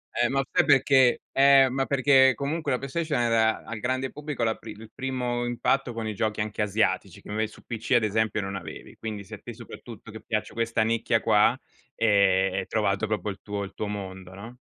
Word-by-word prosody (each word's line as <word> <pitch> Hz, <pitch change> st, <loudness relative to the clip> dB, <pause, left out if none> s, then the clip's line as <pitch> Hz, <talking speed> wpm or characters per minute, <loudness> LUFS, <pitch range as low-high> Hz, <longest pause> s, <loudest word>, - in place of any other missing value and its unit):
Eh, 120 Hz, 0 st, +2 dB
ma 135 Hz, +1 st, +1 dB
sai 180 Hz, -, +3 dB
perché 135 Hz, -3 st, +4 dB
eh, 135 Hz, -1 st, +6 dB
ma 135 Hz, 0 st, -1 dB
perché 135 Hz, -1 st, +5 dB
comunque 150 Hz, +2 st, -3 dB
la 125 Hz, -, +2 dB
PlayStation 150 Hz, +2 st, -2 dB
era 115 Hz, -2 st, +2 dB
al 115 Hz, -, -7 dB
grande 130 Hz, +3 st, -2 dB
pubblico 150 Hz, -4 st, -5 dB
la 115 Hz, -1 st, +2 dB
pri 115 Hz, -, -12 dB
il 110 Hz, +1 st, -13 dB
primo 125 Hz, -2 st, -2 dB
impatto 120 Hz, +2 st, 0 dB
con 115 Hz, -1 st, -5 dB
i 110 Hz, -, -3 dB
giochi 110 Hz, +1 st, -2 dB
anche 105 Hz, 0 st, -3 dB
asiatici, 105 Hz, +2 st, 0 dB
che -, -, -15 dB
inve 110 Hz, +1 st, -1 dB
su -, -, -17 dB
PC 115 Hz, +1 st, -3 dB
ad 120 Hz, -2 st, +4 dB
esempio 110 Hz, +1 st, 0 dB
non 100 Hz, -1 st, -4 dB
avevi, 85 Hz, -5 st, -9 dB
quindi 105 Hz, -2 st, -6 dB
se 100 Hz, -, -14 dB
a -, -, -14 dB
te, 120 Hz, -, -8 dB
soprattutto 115 Hz, -1 st, -11 dB
che 110 Hz, -, -10 dB
piace 110 Hz, -1 st, -3 dB
questa 115 Hz, -1 st, 0 dB
nicchia 115 Hz, +1 st, +1 dB
qua, 105 Hz, -2 st, +3 dB, 0.4 s
ehm, 100 Hz, -3 st, +3 dB
hai -, -, -5 dB
trovato 105 Hz, 0 st, 0 dB
proprio 105 Hz, -1 st, -2 dB
il 100 Hz, -, -10 dB
tuo 100 Hz, -1 st, -4 dB
il 100 Hz, 0 st, -8 dB
tuo 105 Hz, -, -4 dB
mondo, 95 Hz, -2 st, -7 dB
no. 115 Hz, +5 st, -10 dB
115 Hz, 210 wpm, -26 LUFS, 105-130 Hz, 0.4 s, eh